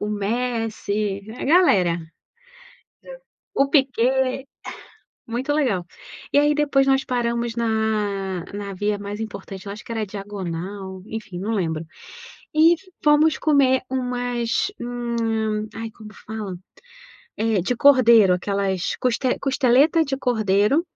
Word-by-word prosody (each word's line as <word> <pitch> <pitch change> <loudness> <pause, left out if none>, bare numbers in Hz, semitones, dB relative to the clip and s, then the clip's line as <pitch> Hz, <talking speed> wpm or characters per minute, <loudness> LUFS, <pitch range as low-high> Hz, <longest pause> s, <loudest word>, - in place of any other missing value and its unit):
o 210 - -2
Messi, 215 -2 -2 0.2
a - - -4
galera, 200 - +4 1.6
o 275 - +3
Piquét, 265 -1 +1 0.8
muito 245 +5 -2
legal, 240 - 0 0.5
e - - +5
aí 295 +1 +4
depois 285 -2 +2
nós 270 0 +3
paramos 235 -2 -1
na 210 -5 -1
na 200 -1 -5
via 205 +2 -1
mais 205 +1 -6
importante 200 -2 -7
eu 200 - -4
acho 215 - -10
que - - -7
era 225 -2 -1
diagonal, 190 -1 -6
enfim 215 -5 -7
não 205 +5 -3
lembro, 165 -6 -1 0.7
e 325 +2 +6 0.3
fomos 300 +1 +4
comer 275 -4 +3
umas, 245 - -1
hum, 225 -3 -2
ai 225 0 -5
como 215 -1 -13
fala, 215 -4 -5 0.8
eh, 220 -2 +1
de 240 +8 -1
cordeiro 235 -7 +6
aquelas 195 0 -1
cos 250 -2 0 0.2
costeleta 270 +4 +3
de 270 0 -2
cordeiro. 220 - +2
225 Hz, 120 wpm, -22 LUFS, 200-255 Hz, 1.6 s, e